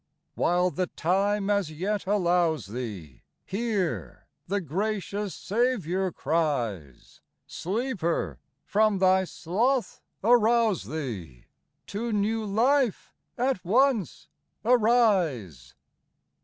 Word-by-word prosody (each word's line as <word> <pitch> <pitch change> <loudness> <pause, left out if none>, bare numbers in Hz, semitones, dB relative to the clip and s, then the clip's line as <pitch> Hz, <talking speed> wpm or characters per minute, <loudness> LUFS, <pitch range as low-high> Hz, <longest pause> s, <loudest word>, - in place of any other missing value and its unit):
While 180 +1 +2
the 180 +4 -1
time 195 +5 0
as 200 -5 +1
yet 190 +6 -3
allows 175 -5 +2
thee, 100 - -7 0.2
Hear; 190 - -2 0.2
the 200 +2 0
gracious 200 +3 -3
Saviour 195 -5 0
cries, 125 - -2
— - - -53
" - - -53
Sleeper, 180 - -2 0.3
from 215 0 +2
thy 190 0 +4
sloth 230 +11 -1 0.2
arouse 230 -3 +3
thee, 105 - -6 0.4
To 225 +4 -4
new 215 +2 0
life 240 +3 +1 0.2
at 250 -5 0
once 230 - +1 0.4
arise 190 - +2
190 Hz, 95 wpm, -27 LUFS, 160-220 Hz, 0.4 s, thy